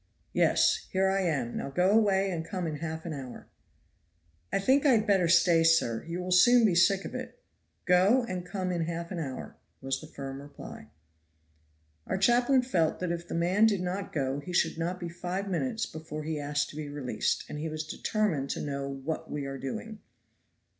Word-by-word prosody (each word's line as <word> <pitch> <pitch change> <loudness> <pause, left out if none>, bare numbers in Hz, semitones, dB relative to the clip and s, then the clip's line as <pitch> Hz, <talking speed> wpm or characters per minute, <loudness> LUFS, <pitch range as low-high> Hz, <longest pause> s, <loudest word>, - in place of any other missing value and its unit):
"Yes! - - +3
here 190 0 +2
I 195 0 +1
am. 140 -10 -1
Now - - -4
go 180 +7 +2
away 195 -3 +3
and 165 -2 -3
come 180 +2 -4
in 155 -2 -3
half 160 +1 -5
an 165 - -4
hour." 130 -4 -8 1.1
"I - - +2
think 260 +8 +3
I 280 -4 +5
had 215 -2 +3
better 190 -4 +3
stay, 170 -1 +5
sir. 165 -9 +3
You 170 +2 -3
will 185 - -4
soon 235 +7 +6
be 200 - +3
sick 190 +3 +3
of - - -6
it." - - -7 0.5
"Go, 190 +8 +4
and 185 -1 -4
come 185 0 -3
in 170 -2 -1
half 170 +1 -5
an 180 - -3
hour," 135 -5 -6 0.2
was 135 0 -3
the 155 - -10
firm 135 -2 -7
reply. 140 - -10 1.2
Our - - -1
chaplain 245 +5 +4
felt 175 -11 +1
that 180 -2 -2
if 170 0 -4
the - - -4
man 185 +6 +4
did 205 -4 +1
not 185 +2 -3
go 135 -2 -1
he 175 +5 -7
should 170 - +1
not 175 +2 -2
be 175 - -4
five 180 +3 -4
minutes 225 +5 -1
before 155 -1 -7
he 155 0 -3
asked 145 0 -1
to - - -13
be 150 -1 -5
released, 145 -3 -2
and 150 - -6
he 160 +1 -3
was 155 0 -4
determined 160 -5 -1
to - - -3
know 140 -1 -3
"what 140 +4 -5
we 145 -1 -4
are 135 0 -5
doing." 215 - -6
170 Hz, 200 wpm, -29 LUFS, 150-195 Hz, 1.2 s, soon